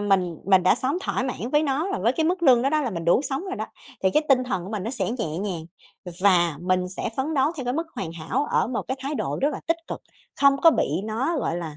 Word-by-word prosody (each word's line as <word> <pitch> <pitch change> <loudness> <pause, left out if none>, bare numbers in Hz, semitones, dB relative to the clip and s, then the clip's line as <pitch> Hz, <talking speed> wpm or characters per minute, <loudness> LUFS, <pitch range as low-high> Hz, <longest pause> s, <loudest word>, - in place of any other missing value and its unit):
mình 185 -5 +1
mình 190 -1 +5
đã 185 - +5
sống 265 +7 -1
thỏa - - -1
mãn 250 -2 -4
với 295 +1 +4
nó 300 +4 0
và - - -1
với 225 +6 +2
cái 320 +4 0
mức 350 +2 0
lương 255 -6 +6
đó 270 - +2
đó 310 0 +2
là 250 - -1
mình 170 -4 -5
đủ 170 +7 +4
sống 275 +4 -3
rồi 380 -1 -4
đó, - - -3 0.4
thì 190 - +3
cái 300 - +3
tinh 255 -2 +4
thần 190 -8 -2
của 190 - -7
mình 210 -3 -3
nó 220 - -3
sẽ 225 -6 -2
nhẹ 160 -7 -2
nhàng, 185 -5 -3 0.4
ừ, 180 - -7
và 175 -5 +4
mình 180 0 0
sẽ 190 - -4
phấn 285 +4 -1
đấu 275 +1 +3
theo 270 - -4
cái 245 - -1
mức 325 +5 -2
hoàn 165 -4 -4
hảo 170 - -2
ở - - +2
một 240 -1 -2
cái 260 - -1
thái 280 +3 -3
độ - - -2
rất 285 - +4
là - - -5
tích 330 - +2
cực, - - -5 0.4
không 280 -1 +6
có 330 - +8
bị - - +1 0.2
nó, 240 +10 -1
gọi 170 - -1
là, 160 -4 -6
240 Hz, 290 wpm, -24 LUFS, 185-280 Hz, 0.4 s, có